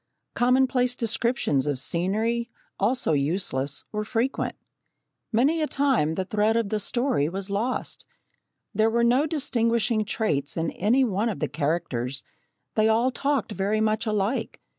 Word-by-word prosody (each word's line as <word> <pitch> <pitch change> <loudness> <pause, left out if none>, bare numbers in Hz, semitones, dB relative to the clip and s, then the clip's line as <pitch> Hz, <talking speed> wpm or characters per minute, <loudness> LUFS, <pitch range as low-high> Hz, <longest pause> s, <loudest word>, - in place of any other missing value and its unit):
Commonplace 250 0 +2
descriptions 230 - 0
of 145 -2 0
scenery, 215 - 0 0.3
also 220 -4 +1
useless, 140 -2 -1
were 210 0 -2
frequent. 235 +4 -1 0.8
Many 280 +8 +2
a 305 - +1
time 265 - +1
the 190 - -2
thread 215 +3 +1
of 230 -3 0
the 215 - 0
story 240 - 0
was 195 +2 -5
lost. 225 +6 -2 0.7
There 220 +1 +3
were 235 +1 +1
no 250 +6 +3
distinguishing 230 -6 +1
traits 170 -11 -1
in 165 0 -1
any 235 +8 +2
one 220 -1 0
of 210 - -3
the 150 - -1
characters 140 -5 -2 0.5
they 215 0 +3
all 235 +4 +3
talked 275 -3 -1
very 205 +2 0
much 220 +1 +1
alike. 210 +3 -1
220 Hz, 140 wpm, -25 LUFS, 185-245 Hz, 0.8 s, There